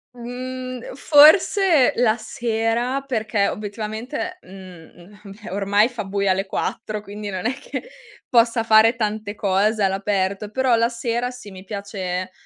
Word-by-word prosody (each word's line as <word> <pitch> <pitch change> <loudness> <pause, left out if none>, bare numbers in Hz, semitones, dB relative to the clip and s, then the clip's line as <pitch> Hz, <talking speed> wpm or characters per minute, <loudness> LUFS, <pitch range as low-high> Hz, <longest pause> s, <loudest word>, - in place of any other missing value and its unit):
Mhmm, 255 +1 -7
forse 310 - +5
la 235 -1 +3
sera, 235 +2 -1
perché 215 -4 0
obiettivamente 220 - -5
mhmm, 185 +1 -14 0.2
beh, 225 - -8
ormai 200 +2 +2
fa 240 -4 -6
buio 200 0 0
alle 195 +1 -1
4 210 +2 -3
quindi 205 0 -7
non 185 -1 -5
è 245 - +1
che 280 +2 -7 0.4
possa 230 -1 +3
fare 225 +1 +5
tante 215 -2 -3
cose 205 +2 +1
all'aperto, 195 +1 -1
però 260 +1 +2
la 230 +1 +2
sera 235 0 -2
sì, 250 -5 -11
mi 185 0 -11
piace, 190 -2 -5
220 Hz, 135 wpm, -22 LUFS, 200-245 Hz, 0.4 s, forse